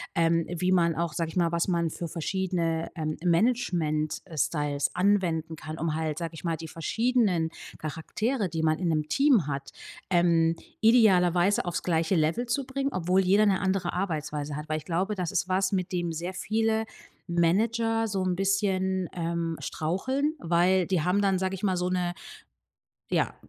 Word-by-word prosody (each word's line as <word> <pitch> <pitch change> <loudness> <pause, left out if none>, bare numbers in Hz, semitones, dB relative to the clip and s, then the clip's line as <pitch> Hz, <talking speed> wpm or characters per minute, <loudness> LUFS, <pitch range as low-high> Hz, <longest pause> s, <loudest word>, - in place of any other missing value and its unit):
Ähm, 165 0 +2
wie 180 +1 0
man 170 -3 +3
auch 170 -1 -1
sage 165 -1 -2
ich - - -10
mal, 170 -2 +2
was 170 0 0
man 170 -3 +1
für 170 +2 -5
verschiedene, 170 -1 -2
ähm, 155 -1 -3
Management 170 -6 +1
äh, 165 -5 -10
Styles 145 -1 0
anwenden 175 -4 +1
kann, 155 +1 -7
um 160 -1 -1
halt, 155 -1 -2
sage 170 0 -4
ich 160 - -10
mal, 165 -1 0
die 160 0 -8
verschiedenen 195 - +1 0.3
Charaktere, 200 - -2
die 160 -1 -3
man 155 0 +2
in 180 - -1
'nem 155 -2 0
Team 270 - +3
hat, 140 -1 -4 0.4
ähm, 170 -2 +3 0.3
idealerweise 195 -5 +4
aufs 175 - -3
gleiche 165 +1 +1
Level 165 +10 +1
zu 260 +3 -1
bringen, 275 +1 -2
obwohl 185 +2 +2
jeder 200 +3 +4
'ne 195 -2 +3
andere 190 -2 0
Arbeitsweise 150 -5 -3
hat. 150 +1 -7
Weil 155 - 0
ich 155 - -8
glaube, 185 +5 -1
das 180 -3 -3
ist 185 - -1
was, 190 +1 +1
mit 185 -1 -1
dem 175 -2 -1
sehr 175 +3 -4
viele 220 +3 0 0.4
Manager 225 +7 +1
so 195 -3 -1
'n 185 -1 0
bisschen, 190 -1 0
ähm, 165 -1 -2
straucheln, 260 - -1
weil 175 -1 +2
die 185 -4 +1
haben 180 +5 +1
dann, 195 -2 +2
sage 190 0 -1
ich 190 - -10
mal, 190 -3 +2
so 180 0 -1
'ne, 180 -1 -1 1.0
ja, - - +1
175 Hz, 180 wpm, -27 LUFS, 165-195 Hz, 1.0 s, idealerweise